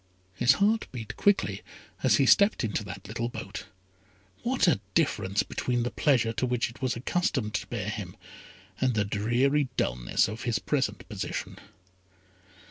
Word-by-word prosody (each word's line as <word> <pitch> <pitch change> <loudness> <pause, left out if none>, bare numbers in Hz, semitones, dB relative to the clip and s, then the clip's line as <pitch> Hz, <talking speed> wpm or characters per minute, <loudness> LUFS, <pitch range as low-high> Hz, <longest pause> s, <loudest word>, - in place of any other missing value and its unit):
His 120 +7 +4
heart 210 +8 +2
beat 110 -4 -6
quickly 205 0 +2 0.4
as - - +4
he - - +4
stepped 200 -6 +5
into 110 0 -1
that 95 +1 -8
little 115 +3 -3
boat. - - -7 0.8
What 250 -4 +1
a 170 - +4 0.2
difference 105 - +1
between 120 -1 -1
the 125 - -2
pleasure 120 -6 +2
to 125 - 0
which 125 -1 0
it 115 - -17
was 130 -1 0
accustomed 130 -4 -1
to - - -2
bear 105 -5 -4
him, 100 -4 -5 0.6
and 130 -3 +1
the 105 -1 +2
dreary 125 +7 +1
dulness - - +1
of 110 +2 -6
his 115 -2 0
present 130 +8 -1
position. 105 -4 -5
120 Hz, 155 wpm, -28 LUFS, 105-135 Hz, 0.8 s, stepped